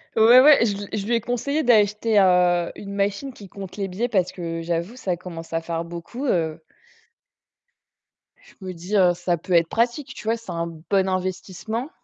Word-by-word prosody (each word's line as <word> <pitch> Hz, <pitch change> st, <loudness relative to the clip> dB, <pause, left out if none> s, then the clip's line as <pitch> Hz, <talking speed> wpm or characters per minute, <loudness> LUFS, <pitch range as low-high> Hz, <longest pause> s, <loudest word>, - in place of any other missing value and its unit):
Ouais 235 Hz, +3 st, +7 dB
ouais, 290 Hz, -3 st, +7 dB
je 205 Hz, -3 st, 0 dB
l 200 Hz, 0 st, -7 dB
je 205 Hz, -1 st, -3 dB
lui 240 Hz, -, +2 dB
ai 230 Hz, -, 0 dB
conseillé 280 Hz, +7 st, -1 dB
d'acheter, 215 Hz, -2 st, +3 dB
heu, 180 Hz, -2 st, +3 dB
une 200 Hz, 0 st, -8 dB
machine 200 Hz, +7 st, -2 dB
qui 200 Hz, -4 st, -13 dB
compte 195 Hz, -1 st, -9 dB
les 195 Hz, -1 st, -2 dB
billets, 215 Hz, +7 st, -3 dB
parce 190 Hz, -6 st, +1 dB
que 165 Hz, -2 st, -5 dB
j'avoue, 170 Hz, +6 st, -3 dB
ça 185 Hz, -8 st, -3 dB
commence 165 Hz, -2 st, -9 dB
à 165 Hz, -, 0 dB
faire 165 Hz, 0 st, -3 dB
beaucoup, 170 Hz, -, -7 dB
heu 160 Hz, -, 0 dB, 1.8 s
je -, -, -20 dB
me 185 Hz, -, -5 dB
dis, 180 Hz, +5 st, -5 dB
heu, 180 Hz, -3 st, +5 dB
ça 175 Hz, 0 st, -1 dB
peut 180 Hz, +3 st, -5 dB
être 170 Hz, -1 st, +4 dB
pratique, 245 Hz, +4 st, -1 dB
tu 215 Hz, -, -9 dB
vois? 225 Hz, +1 st, +1 dB
C'est 230 Hz, -5 st, -10 dB
un 170 Hz, 0 st, -3 dB, 0.2 s
bon 195 Hz, -1 st, +2 dB
investissement. 185 Hz, -, -3 dB
195 Hz, 195 wpm, -23 LUFS, 175-230 Hz, 1.8 s, Ouais